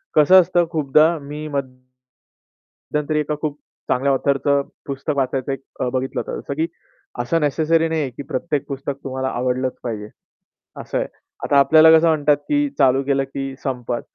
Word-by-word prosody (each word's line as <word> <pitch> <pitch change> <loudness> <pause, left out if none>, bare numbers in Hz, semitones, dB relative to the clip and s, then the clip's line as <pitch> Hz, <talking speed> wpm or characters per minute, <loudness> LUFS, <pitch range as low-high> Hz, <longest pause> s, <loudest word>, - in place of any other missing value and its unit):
कसं 180 +5 +7
असतं 175 0 +1
खूपदा 155 +2 +3
मी 150 +2 -7
मध्यंतरी 130 +3 -6
एका 150 0 -1
खूप 150 -2 -3 0.3
चांगल्या 135 +2 +2
ऑथरचं 140 +1 +1 0.2
पुस्तक 140 +2 -3
वाचायचं 135 0 -1
एक 135 - -4 0.2
अ, 125 - 0
बघितलं 130 0 -2
होतं. - - -5
जसं 140 - -5
की 160 +3 -1 0.5
असं 165 +7 0
नेसेसरी 160 +3 +2
नाही 160 -1 0
आहे, 140 - -2
की 125 +3 -9
प्रत्येक 145 +1 -2
पुस्तक 140 0 -4
तुम्हाला 130 0 -3
आवडलंच 130 0 -1
पाहिजे. 105 -3 -5 0.7
असं - - -4
आहे. - - -1 0.4
आता 140 - +2
आपल्याला 155 +3 +7
कसं 165 - +3
म्हणतात, 150 -2 +3
की 290 - 0
चालू 135 -1 +3
केलं 135 0 +1
की 135 -1 -4
संपत. 125 -3 -3
140 Hz, 160 wpm, -21 LUFS, 130-155 Hz, 0.7 s, कसं